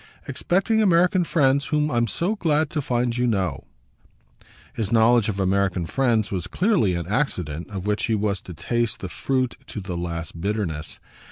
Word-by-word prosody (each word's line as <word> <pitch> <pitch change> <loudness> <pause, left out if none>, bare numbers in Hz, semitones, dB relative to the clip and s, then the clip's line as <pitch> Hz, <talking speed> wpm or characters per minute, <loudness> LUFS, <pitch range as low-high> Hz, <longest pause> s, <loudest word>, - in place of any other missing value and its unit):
"Expecting 195 +5 +1
American 180 -1 +4
friends 140 -4 +2
whom 150 0 0
I'm 120 -1 +1
so 175 - -1
glad 155 -5 +1
to 150 - -1
find 120 -2 0
you 125 0 +1
know!" 95 -5 -1 1.1
His 110 -4 -3
knowledge 115 0 +4
of 100 -2 -3
American 95 -2 +1
friends 115 0 +1
was 90 -4 -3
clearly 180 - +2
an 85 -1 -3
accident 90 - -2
of 95 -2 -6
which 105 0 0
he 115 - +1
was 100 -2 -1
to 90 - -10
taste 115 +7 -1
the 95 - -5
fruit 130 +7 -1
to - - -6
the 95 -2 -5
last 85 -1 -5
bitterness. 95 -6 -3
110 Hz, 170 wpm, -23 LUFS, 95-140 Hz, 1.1 s, American